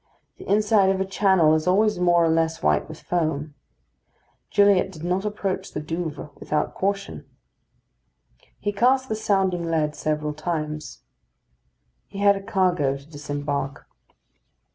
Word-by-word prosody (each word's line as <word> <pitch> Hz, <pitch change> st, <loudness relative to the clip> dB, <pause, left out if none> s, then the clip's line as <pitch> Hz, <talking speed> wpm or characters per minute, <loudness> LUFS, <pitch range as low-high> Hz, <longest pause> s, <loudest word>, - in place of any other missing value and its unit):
The -, -, -11 dB
inside 210 Hz, -1 st, +4 dB
of 190 Hz, 0 st, +1 dB
a 190 Hz, -, 0 dB
channel 190 Hz, -5 st, +3 dB
is 155 Hz, +1 st, 0 dB
always 210 Hz, +1 st, +3 dB
more 175 Hz, -1 st, +4 dB
or -, -, +2 dB
less 160 Hz, 0 st, 0 dB
white 75 Hz, 0 st, +2 dB
with -, -, -10 dB
foam. 155 Hz, -4 st, -1 dB, 1.0 s
Gilliatt 200 Hz, -2 st, +4 dB
did 160 Hz, -4 st, -11 dB
not 180 Hz, +3 st, -1 dB
approach 195 Hz, -2 st, -3 dB
the -, -, -3 dB
Douvres 160 Hz, -1 st, -5 dB
without 150 Hz, 0 st, -1 dB
caution. 200 Hz, +1 st, -3 dB, 1.3 s
He 205 Hz, -, -3 dB
cast 260 Hz, +5 st, +2 dB
the 220 Hz, -, 0 dB
sounding 190 Hz, -5 st, 0 dB
lead 155 Hz, -2 st, 0 dB
several 150 Hz, 0 st, -2 dB
times. 155 Hz, -1 st, -4 dB, 1.0 s
He -, -, -11 dB
had 200 Hz, 0 st, +4 dB
a 195 Hz, -, -5 dB
cargo 180 Hz, -9 st, +1 dB
to 140 Hz, -, -16 dB
disembark. 145 Hz, -2 st, -4 dB
175 Hz, 140 wpm, -24 LUFS, 155-195 Hz, 1.3 s, inside